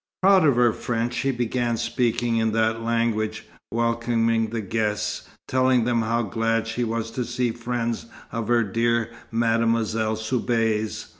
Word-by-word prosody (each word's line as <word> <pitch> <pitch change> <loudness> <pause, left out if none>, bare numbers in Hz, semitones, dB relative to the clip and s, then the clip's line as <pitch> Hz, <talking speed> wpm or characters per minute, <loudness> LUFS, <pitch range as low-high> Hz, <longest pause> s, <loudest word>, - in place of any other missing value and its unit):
Proud 190 -4 +6
of 140 - +4
her 120 -2 +4
French, 120 0 -2
she 135 - 0
began 120 -1 0
talking 120 0 0
in 110 -1 +1
that 110 0 +1
language, 115 -2 -1 0.2
welcoming 115 -1 +1
the 115 +1 -4
guests, 105 0 -2 0.2
telling 130 -2 +3
them 120 0 +1
how 115 +1 0
glad 115 +2 0
she 115 +2 -2
was 115 0 -2
to 125 - -2
see 120 0 -1
friends 115 0 -3 0.2
of 115 -2 -3
her 120 -1 +3
dear 115 +2 0 0.2
Mademoiselle 115 -1 +1
Soubise. 110 -1 -1
115 Hz, 145 wpm, -24 LUFS, 110-120 Hz, 0.2 s, Proud